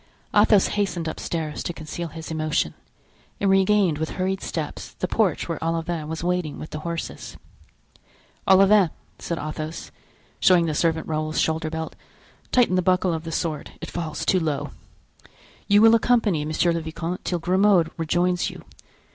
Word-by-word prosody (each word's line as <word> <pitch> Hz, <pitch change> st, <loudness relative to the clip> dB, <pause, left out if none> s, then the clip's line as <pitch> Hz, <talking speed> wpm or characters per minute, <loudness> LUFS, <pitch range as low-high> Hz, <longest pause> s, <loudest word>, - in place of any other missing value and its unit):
Athos 205 Hz, -3 st, +5 dB
hastened 180 Hz, -5 st, -1 dB
upstairs 160 Hz, -1 st, -3 dB
to 175 Hz, -, -3 dB
conceal 165 Hz, +2 st, -6 dB
his 160 Hz, 0 st, -8 dB
emotion, 155 Hz, -1 st, 0 dB, 0.7 s
and 195 Hz, -1 st, +2 dB
regained 195 Hz, -4 st, +3 dB
with 160 Hz, -, -2 dB
hurried 190 Hz, +1 st, -1 dB
steps 155 Hz, -3 st, -5 dB
the 185 Hz, -, -3 dB
porch 195 Hz, -5 st, +1 dB
where 165 Hz, -1 st, -4 dB
Olivain 165 Hz, -1 st, -2 dB
was 160 Hz, +1 st, -5 dB
waiting 180 Hz, -4 st, -1 dB
with 155 Hz, -, -8 dB
the 155 Hz, -, -4 dB
horses. 170 Hz, +1 st, -5 dB, 1.1 s
"Olivain," 195 Hz, -1 st, +6 dB, 0.3 s
said 170 Hz, -, -3 dB
Athos, 155 Hz, +1 st, -5 dB, 0.5 s
showing 180 Hz, -2 st, +5 dB
the 160 Hz, -, -1 dB
servant 160 Hz, +1 st, +1 dB
Raoul's 155 Hz, 0 st, -1 dB
shoulder 160 Hz, 0 st, 0 dB
belt, 160 Hz, 0 st, -5 dB, 0.6 s
"tighten 245 Hz, -7 st, +4 dB
the 185 Hz, -, +3 dB
buckle 180 Hz, 0 st, +2 dB
of 160 Hz, 0 st, -4 dB
the 165 Hz, -, -5 dB
sword, 160 Hz, -2 st, -3 dB
it -, -, -7 dB
falls 165 Hz, -3 st, -4 dB
too 185 Hz, -, +3 dB
low. 155 Hz, -4 st, -2 dB, 1.0 s
You 205 Hz, +1 st, +5 dB
will 225 Hz, 0 st, +8 dB
accompany 225 Hz, -9 st, +2 dB
monsieur 155 Hz, +3 st, +1 dB
le 165 Hz, 0 st, -1 dB
vicomte 165 Hz, +3 st, -5 dB
till 175 Hz, -, -1 dB
Grimaud 180 Hz, -1 st, +3 dB
rejoins 175 Hz, +2 st, +1 dB
you. -, -, -11 dB
170 Hz, 155 wpm, -24 LUFS, 160-185 Hz, 1.1 s, will